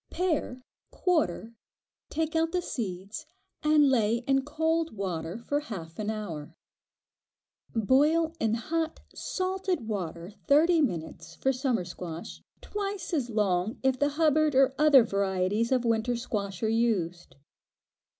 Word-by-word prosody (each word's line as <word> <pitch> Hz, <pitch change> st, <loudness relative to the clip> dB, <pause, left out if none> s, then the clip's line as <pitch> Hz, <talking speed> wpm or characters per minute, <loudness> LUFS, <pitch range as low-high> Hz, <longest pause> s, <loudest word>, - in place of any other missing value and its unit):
Pare, 310 Hz, -8 st, -1 dB, 0.3 s
quarter, 265 Hz, -, 0 dB, 0.6 s
take 320 Hz, +1 st, -2 dB
out 325 Hz, 0 st, +2 dB
the 365 Hz, -, +2 dB
seeds, 195 Hz, -, -5 dB, 0.3 s
and 300 Hz, -1 st, +5 dB
lay 230 Hz, -1 st, +2 dB
in 270 Hz, 0 st, +2 dB
cold 320 Hz, -1 st, -1 dB
water 175 Hz, -2 st, -3 dB
for 285 Hz, +5 st, -1 dB
half 180 Hz, -, -8 dB
an 215 Hz, 0 st, -2 dB
hour. 170 Hz, -8 st, -5 dB, 1.2 s
Boil 300 Hz, +9 st, +3 dB
in 225 Hz, -4 st, +1 dB
hot 320 Hz, +7 st, -2 dB
salted 370 Hz, -, -2 dB
water 175 Hz, -4 st, -4 dB, 0.2 s
thirty 320 Hz, +3 st, +5 dB
minutes 165 Hz, -, -3 dB
for 270 Hz, -, +1 dB
summer 255 Hz, -7 st, 0 dB
squash; 175 Hz, -1 st, -7 dB, 0.2 s
twice 400 Hz, -3 st, -4 dB
as 270 Hz, -7 st, 0 dB
long 210 Hz, 0 st, 0 dB
if 265 Hz, -1 st, +2 dB
the 285 Hz, +1 st, +3 dB
"Hubbard" 310 Hz, -2 st, +3 dB
or 270 Hz, 0 st, +5 dB
other 295 Hz, -5 st, +7 dB
varieties 200 Hz, +2 st, 0 dB
of 250 Hz, -2 st, +2 dB
winter 230 Hz, +1 st, +1 dB
squash 200 Hz, -5 st, -4 dB
are -, -, +3 dB
used. 210 Hz, -7 st, 0 dB
235 Hz, 130 wpm, -28 LUFS, 195-305 Hz, 1.2 s, other